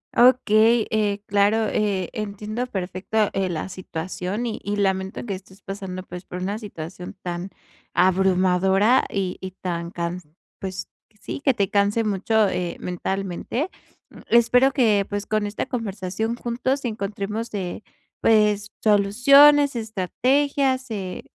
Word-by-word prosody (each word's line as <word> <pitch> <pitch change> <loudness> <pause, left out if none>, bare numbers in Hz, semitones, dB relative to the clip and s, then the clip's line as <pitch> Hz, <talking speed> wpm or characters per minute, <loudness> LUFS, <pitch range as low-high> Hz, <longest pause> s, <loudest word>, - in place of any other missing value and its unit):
Okey, 235 -2 +5
eh, 205 -2 0
claro, 205 +2 +2
eh, 195 -4 -1
entiendo 215 +3 -4
perfecto, 195 +2 -1
eh, 195 -1 0
la 165 +1 -3
situación 185 +4 -4
y 225 - -3
y 205 +1 -2
lamento 190 +1 -1
que 205 - -3
estés 190 +1 -11
pasando, 190 -2 -6
pues, 180 0 -9
por 180 - -7
una 205 +3 -2
situación 180 -3 -8
tan 175 +1 -4 0.5
abrumadora 190 +4 +3
y 190 -2 -2
y 190 0 -5
tan, 170 -2 -3
can 175 +1 -4 0.4
pues, 190 -1 -5 0.3
sí, 280 - -6
que 270 -4 +3
te 200 0 0
canse 205 +2 +2
mucho, 215 +1 +2
eh, 180 -2 -2
mentalmente. 195 - -3 0.4
Mm, - - -13
espero 245 +3 +5
que, 220 -7 +3
pues 205 0 -3
con 215 -1 0
esta 205 +4 -3
conversación 220 -2 -3
juntos 255 +3 -2
encontremos, 215 +1 -3
eh, 185 +1 -4 0.4
pues 210 -2 +3
soluciones, 275 +8 +6
estrategias, 260 +6 0
eh, 190 -4 -5
205 Hz, 130 wpm, -23 LUFS, 185-225 Hz, 0.5 s, soluciones